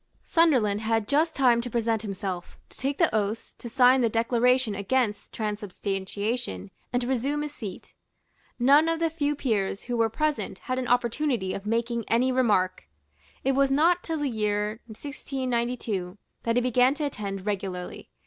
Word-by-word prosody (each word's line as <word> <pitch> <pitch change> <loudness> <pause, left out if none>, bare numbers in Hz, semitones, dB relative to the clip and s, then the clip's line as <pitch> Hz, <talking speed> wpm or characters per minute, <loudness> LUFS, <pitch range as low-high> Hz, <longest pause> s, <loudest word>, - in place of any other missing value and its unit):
Sunderland 250 - +3
had 225 -1 0
just 315 +3 +2
time 245 -3 +4
to 245 - -5
present 230 -2 0
himself, 195 -4 -5
to - - -14
take 275 +2 -1
the 335 - +3
oaths, 215 +1 -1
to 240 - -7
sign 255 +1 +5
the 235 - +3
declaration 235 +1 +2
against 210 +2 -1
transubstantiation, 200 - -3 0.2
and 245 0 +1
to - - -3
resume 270 +4 0
his 300 -1 -5
seat. 200 -9 -8 0.6
None 285 +6 +5
of 330 0 0
the 330 -1 +1
few 295 -2 0
peers 210 -8 -1
who 245 - -3
were 225 -1 +2
present 260 -7 -1
had 255 +5 -3
an 250 - -3
opportunity 245 -4 +1
of 200 +1 -6
making 230 0 -1
any 250 +3 +2
remark. 205 -8 +1 0.6
It 270 - +2
was 275 0 +3
not 330 +6 +3
till 325 -2 -3
the 295 -1 -1
year 210 -1 -1
1692 240 -6 -3 0.3
that 230 0 +1
he 245 - +3
began 250 +2 +3
to 300 0 -2
attend 200 -7 -4
regularly. 190 -3 -4
235 Hz, 165 wpm, -26 LUFS, 210-270 Hz, 0.6 s, sign